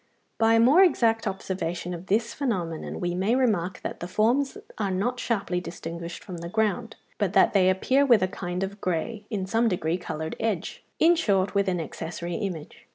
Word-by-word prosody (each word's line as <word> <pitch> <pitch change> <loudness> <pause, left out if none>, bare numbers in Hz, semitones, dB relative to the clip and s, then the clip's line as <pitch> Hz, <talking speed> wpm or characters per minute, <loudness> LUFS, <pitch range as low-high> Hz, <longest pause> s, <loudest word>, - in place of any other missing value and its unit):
By 225 0 +5
a - - +5
more 270 +10 +6
exact 230 -11 +3
observation 180 -2 -3
of 175 +2 -8
this 225 +4 +1
phenomenon 180 - -3
we 175 -1 -1
may 195 +7 +1
remark 200 -9 0
that - - -5
the 175 - -5
forms 240 +9 +1 0.2
are 200 -2 0
not 220 +7 -1
sharply 200 -6 -1
distinguished 170 0 -7
from 180 -3 -7
the 170 0 -6
ground, 220 +3 0 0.2
but 200 -3 0
that - - +5
they 185 -2 +5
appear 255 +9 +3
with 240 -8 +5
a - - +2
kind 180 0 -4
of 200 +1 -5
grey, 200 +5 -2
in 200 -5 -2
some 225 +4 +2
degree, 175 -3 0
coloured 160 -2 -5
edge; 215 -7 -2 0.2
in 340 +2 +6
short, 200 - +1
with 200 -1 +2
an 180 -1 -1
accessory 170 +1 -5
image. 180 -6 -5
195 Hz, 190 wpm, -26 LUFS, 175-225 Hz, 0.2 s, more